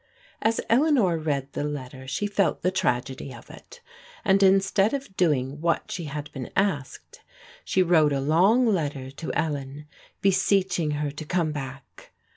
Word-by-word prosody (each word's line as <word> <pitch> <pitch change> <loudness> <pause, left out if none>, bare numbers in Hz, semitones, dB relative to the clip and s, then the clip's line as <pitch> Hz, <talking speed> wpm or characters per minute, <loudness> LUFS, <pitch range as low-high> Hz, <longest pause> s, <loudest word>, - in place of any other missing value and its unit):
As 225 +1 +1
EHeanor 235 - +3
read 140 -3 -2
the - - -2
letter 130 -3 -6
she 135 +10 -2
felt 205 -4 0
the 185 - +2
tragedy 135 -7 -1
of - - -12
it, 485 0 -14 0.4
and 195 0 +4
instead 195 +4 +4
of 270 -8 -7
doing 145 -5 0
what 170 0 0
she 170 - -4
had 150 0 -6
been 130 -4 -6
asked 185 -10 -2 0.4
she 190 - +2
wrote 160 -4 +4
a 140 - 0
long 180 - +4
letter 145 - -1
to 155 +4 -5
Ellen 145 -1 -3 0.3
beseeching 190 -4 +2 0.2
her 145 - -2
to 145 +2 -7
come 165 0 0
back. 135 -2 -8
160 Hz, 155 wpm, -25 LUFS, 140-195 Hz, 0.4 s, and